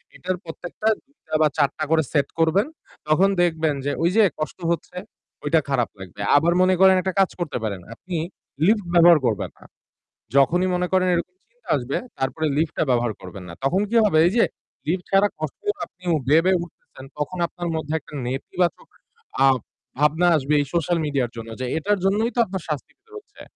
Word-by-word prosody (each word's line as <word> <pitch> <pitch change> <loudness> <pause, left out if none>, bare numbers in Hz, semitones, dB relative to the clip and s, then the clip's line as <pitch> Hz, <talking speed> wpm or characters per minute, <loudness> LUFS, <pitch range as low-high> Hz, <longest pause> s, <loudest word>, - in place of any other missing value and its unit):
এটার 185 0 -3
প্রত্যেকটা 175 +6 -6 0.2
২ 280 +2 -36
টা 155 - -2
বা 155 - +6
৪ 140 -3 +3
টা 155 - -2
করে 160 -1 +4
set 140 -3 +2
করবেন। 165 - +3 0.4
তখন 175 +6 +4
দেখবেন 160 -3 +1
যে 145 - +1
ঐ - - 0
যে 225 - +6 0.2
কষ্ট 155 - -4
হচ্ছে, 170 +2 -4 0.5
ওইটা 155 +2 +3
খারাপ 125 -4 +1
লাগবে। 95 +2 -9 0.2
আবার 170 +4 +3
মনে 185 0 +4
করেন 190 0 +7
একটা 190 0 -2
কাজ 195 - +4
করতে 170 -7 -2
পারেন। 100 -4 -3
আপনি 180 +7 -7 0.5
lift 210 -3 +3
ব্যবহার 170 -1 +8
করবেন 110 -5 0
না। - - -16 0.7
যখনই 175 +7 +4
মনে 180 0 0
করেন 185 0 +3
এরকম 175 +1 -2
চিন্তা 240 -1 -22
আসবে 130 +2 -3 0.2
তারপরে 145 +4 -1
lift 155 0 0
টা - - +2
ব্যবহার 120 -2 +1
করবেন 95 0 -9
না। - - -8
তখন 180 +9 +2
কি 235 - -2
হবে? 160 -6 +3
এই - - +1
যে - - +6 0.4
lift 180 +2 0
ছাড়া 195 +1 +5
কষ্ট 155 -3 -5 0.2
আপনিও 180 -2 -4
বেয়ে, 160 +4 +5
বেয়ে 185 -1 +3
উঠতেছেন 145 -5 -14
তখন 150 +5 -3
আপনার 175 0 -5
মধ্যে 155 -1 -3
একটা - - -18
নেতিবাচক 170 +7 -2 0.5
ভাব 135 -1 +5 0.4
ভাবনা 155 +4 +3
আসবে 140 +1 -1
এই 145 - +1
সোশ্যাল 170 0 +1
মিডিয়ার 135 -5 -1
জন্য 115 0 -7
যে - - -1
এটার 205 +6 +1
জন্যই 215 +5 +2
তো 240 - 0
আপনার 190 -3 -5
শাস্তিটা 155 - -6
হচ্ছে। 410 -1 -14
165 Hz, 190 wpm, -23 LUFS, 145-185 Hz, 0.7 s, ব্যবহার